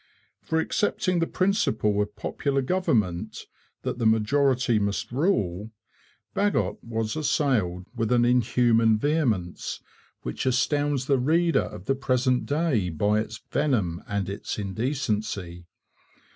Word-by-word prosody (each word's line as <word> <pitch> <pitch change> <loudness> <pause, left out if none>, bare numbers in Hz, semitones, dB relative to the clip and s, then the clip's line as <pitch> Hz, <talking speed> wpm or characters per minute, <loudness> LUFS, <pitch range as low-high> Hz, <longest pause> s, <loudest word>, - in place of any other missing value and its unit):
For 160 - -1
accepting 185 +1 0
the 165 - +1
principle 110 - +1
of 105 0 -4
popular 135 +6 -1
government, 115 - -1 0.4
that - - -3
the 115 - +3
majority 125 +2 +2
must 100 +2 -2
rule, 110 - 0 0.6
Bagot 205 0 0
was 115 -2 -3
assailed 130 - 0
with 115 0 -1
an 120 -1 +4
inhuman 115 -2 +3
vehemence, 115 - -1 0.4
which 60 - -3
astounds 140 +1 +1
the 135 -1 +2
reader 165 +6 +3
of 90 - -9
the 135 - +2
present 130 -1 0
day 145 - +1
by 105 +6 +1
its 110 0 -6
venom 105 - 0
and 100 -2 -2
its 100 +1 -5
indecency. 105 -5 -3
120 Hz, 120 wpm, -26 LUFS, 105-145 Hz, 0.6 s, an